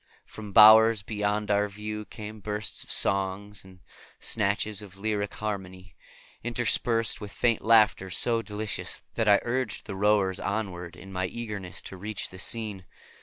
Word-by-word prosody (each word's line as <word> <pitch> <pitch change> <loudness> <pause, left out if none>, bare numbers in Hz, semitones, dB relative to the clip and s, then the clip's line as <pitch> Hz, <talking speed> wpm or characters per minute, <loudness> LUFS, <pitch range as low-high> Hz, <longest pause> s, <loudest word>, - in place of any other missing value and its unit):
From 105 -2 -10
bowers 110 +1 +8
beyond 105 0 -1
our 105 0 +2
view 105 +1 -6
came 110 0 -9
bursts 105 -1 -3
of - - -18
song 100 +2 +1
and 95 -1 -17 0.4
snatches 105 0 -1
of 95 -2 -13
lyric 105 0 -2
harmony, 95 -3 -6 0.5
interspersed 120 -1 0
with 105 -1 -7
faint 115 0 +1
laughter 110 -4 +4
so 115 +5 +2
delicious 105 -1 -4
that 115 -2 -1
I 100 - +6
urged 120 -2 -2
the 100 - -6
rowers 100 -1 +2
onward 95 -5 -4
in 95 0 -12
my 95 0 -1
eagerness 105 -4 -6
to 95 - -9
reach 100 0 -4
the 95 - -11
scene. 105 -4 -2
105 Hz, 150 wpm, -27 LUFS, 95-110 Hz, 0.5 s, bowers